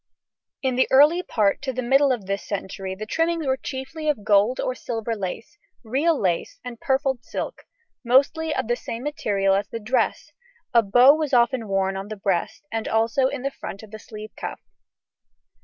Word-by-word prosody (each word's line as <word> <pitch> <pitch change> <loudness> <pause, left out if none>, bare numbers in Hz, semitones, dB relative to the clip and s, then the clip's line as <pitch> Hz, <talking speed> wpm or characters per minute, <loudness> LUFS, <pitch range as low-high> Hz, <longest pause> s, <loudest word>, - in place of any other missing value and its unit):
In 260 -2 0
the 260 - +4
early 295 +6 +6
part 210 - +1
to 270 -1 -2
the 255 0 -3
middle 270 +3 +4
of 235 -6 -2
this 195 +1 -3
century 190 -1 -5
the 215 +3 -6
trimmings 330 +6 0
were 265 -1 +2
chiefly 270 +4 -5
of 270 -9 -1
gold 210 +4 +3
or 255 - -1
silver 230 -2 -4
lace, 215 +8 -6 0.2
real 280 +7 +1
lace, 175 -3 -1
and 240 -2 -8
purfled 265 -2 0
silk, - - -6 0.4
mostly 275 +6 +3
of 260 - -1
the 240 - +1
same 230 0 -6
material 205 -10 0
as 200 +1 0
the 230 - -6
dress: 235 +4 -1 0.4
a 235 - +7
bow 245 +6 +6
was 305 -2 -2
often 240 -1 +2
worn 195 -1 0
on 195 +1 -5
the 215 - -6
breast, 195 - -2
and 225 -1 -2
also 225 +4 +2
in 255 - -5
the 275 - -1
front 200 -5 -8
of 215 - -13
the 215 - -8
sleeve 215 0 -10
cuff. - - -6
240 Hz, 190 wpm, -24 LUFS, 205-270 Hz, 0.4 s, a